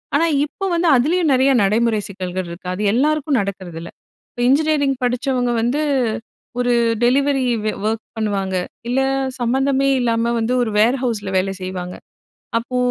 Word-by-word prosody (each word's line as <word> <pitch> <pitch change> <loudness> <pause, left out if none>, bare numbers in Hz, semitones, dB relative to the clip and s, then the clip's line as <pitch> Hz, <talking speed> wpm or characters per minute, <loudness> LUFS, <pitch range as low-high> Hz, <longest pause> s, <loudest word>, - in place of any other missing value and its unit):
ஆனா, 330 +3 +3 0.2
இப்போ 390 +6 -6
வந்து 335 -1 +2
அதிலேயும் 315 +5 +2
நெறைய 265 +2 +4
நடைமுறை 220 +1 +2
சிக்கல்கள் 185 -1 -4
இருக்கு. 170 +1 -9
அது 195 - -5
எல்லாருக்கும் 295 0 +1
நடக்கிறதில்ல. 180 -4 -6 0.4
இப்ப 240 - -6
இன்ஜினியரிங் 285 -2 +2
படிச்சவங்க 245 0 0
வந்து, 255 +6 0 0.8
ஒரு 245 0 +2 0.3
டெலிவரி 270 +1 +2 0.2
வே 215 - +1 0.2
ஒர்க் 220 0 -2
பண்ணுவாங்க. 195 -3 -1 0.3
இல்ல 260 +2 +1 0.4
சம்மந்தமே 270 +3 +1
இல்லாம 235 0 +1
வந்து, 230 +3 0
1 220 - -2
வேர் 240 +5 +4
ஹவுஸ்ல 210 -5 -2
வேல 195 +1 0
செய்வாங்க. 180 -1 -5 0.6
அப்போ 245 +2 -5
240 Hz, 140 wpm, -19 LUFS, 200-275 Hz, 0.8 s, நெறைய